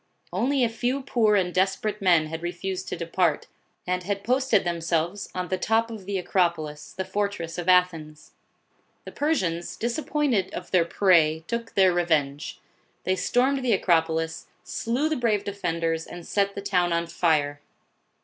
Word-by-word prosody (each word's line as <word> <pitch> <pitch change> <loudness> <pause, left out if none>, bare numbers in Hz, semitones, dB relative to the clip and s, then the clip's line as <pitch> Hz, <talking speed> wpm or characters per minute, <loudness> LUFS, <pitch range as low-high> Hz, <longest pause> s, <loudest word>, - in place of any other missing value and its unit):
Only 270 +1 +1
a - - +4
few 245 +4 -2
poor 220 -5 +2
and 180 -3 +1
desperate 195 +3 0
men 175 -5 +4
had 160 +1 -6
refused 185 +2 -4
to - - -3
depart, 170 -2 0 0.4
and 180 0 -1
had 200 +2 -3
posted 255 -2 +2
themselves 170 +2 -1
on 180 -1 -3
the 185 - -1
top 225 +3 +1
of 205 -4 -9
the 200 -1 -1
Acro 180 -1 +2
polis, 155 -2 -8
the 190 - -3
fortress 190 -4 -3
of 175 +1 -2
Athens. 165 -4 +1 0.7
The - - -8
Persians, 185 - -1
dis 235 +6 -1
appointed 280 -11 0
of 180 - -7
their 180 -3 +4
prey, 165 -4 +3
took 235 +2 -4
their 190 -2 +5
revenge. 155 -4 0 0.5
They 185 - +1
stormed 260 +8 +1
the 245 -3 +2
Acropolis, 165 -3 +1 0.2
slew 245 +7 -1
the 315 - 0
brave 220 -4 +1
defenders, 165 -5 -2
and 175 -1 -9
set 200 -1 0
the 200 - -5
town 180 -3 +1
on 170 0 0
fire. 150 -4 0
185 Hz, 165 wpm, -25 LUFS, 165-210 Hz, 0.7 s, their